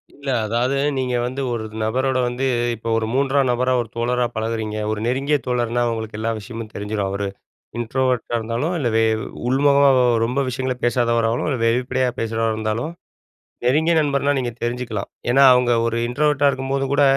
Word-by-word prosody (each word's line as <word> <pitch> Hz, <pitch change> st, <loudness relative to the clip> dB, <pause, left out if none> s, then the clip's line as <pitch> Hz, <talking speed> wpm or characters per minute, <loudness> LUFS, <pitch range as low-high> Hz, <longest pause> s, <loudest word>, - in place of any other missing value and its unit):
இல்ல, 140 Hz, 0 st, -12 dB, 0.2 s
அதாவது 120 Hz, +5 st, 0 dB, 0.2 s
நீங்க 125 Hz, -1 st, -1 dB
வந்து 130 Hz, +3 st, -3 dB
ஒரு 115 Hz, -, -2 dB
இது 110 Hz, -, -13 dB
நபரோட 130 Hz, +4 st, 0 dB
வந்து 125 Hz, +2 st, -2 dB, 0.3 s
இப்ப 115 Hz, +1 st, -9 dB
ஒரு 110 Hz, -, 0 dB
3ஆம் 135 Hz, 0 st, +2 dB
நபரா, 125 Hz, +1 st, +1 dB
ஒரு 120 Hz, -3 st, -3 dB
தோழரா 120 Hz, +1 st, 0 dB
பழகுறீங்க. 110 Hz, -1 st, -2 dB
ஒரு 110 Hz, -, -2 dB
நெருங்கிய 135 Hz, +4 st, +1 dB
தோழர்னா, 120 Hz, -1 st, 0 dB
உங்களுக்கு 110 Hz, -1 st, -5 dB
எல்லா 115 Hz, +1 st, -1 dB
விஷயமும் 115 Hz, +1 st, -7 dB
தெரிஞ்சிரும். 105 Hz, -1 st, -3 dB
அவரு 100 Hz, +1 st, -2 dB, 0.5 s
இன்ட்ரோவர்ட்டா 125 Hz, +1 st, -1 dB
இருந்தாலும், 115 Hz, +9 st, -2 dB
இல்ல 135 Hz, -7 st, 0 dB
வே 115 Hz, -, +4 dB, 0.4 s
உள்முகமாவா 140 Hz, -1 st, +4 dB, 0.2 s
ரொம்ப 125 Hz, +4 st, -1 dB
விஷயங்கள 130 Hz, +1 st, -2 dB
பேசாதவராவும், 115 Hz, -1 st, +1 dB
இல்ல 135 Hz, -, 0 dB
வெளிப்படையா 125 Hz, +2 st, +1 dB
பேசுறவரா 115 Hz, 0 st, 0 dB
இருந்தாலும், 110 Hz, +8 st, -2 dB, 0.7 s
நெருங்கிய 155 Hz, +7 st, +3 dB
நண்பர்னா 140 Hz, -1 st, +1 dB
நீங்க 120 Hz, -2 st, -2 dB
தெரிஞ்சுக்கலாம். 120 Hz, -4 st, -3 dB, 0.2 s
ஏன்னா, 135 Hz, +3 st, +5 dB
அவுங்க 125 Hz, -1 st, +2 dB
ஒரு 115 Hz, 0 st, -1 dB
இன்ட்ரோவர்ட்டா 145 Hz, +2 st, +2 dB
இருக்கும்போது 135 Hz, +1 st, -2 dB
கூட, 145 Hz, -, +3 dB
125 Hz, 155 wpm, -21 LUFS, 115-135 Hz, 0.7 s, ஏன்னா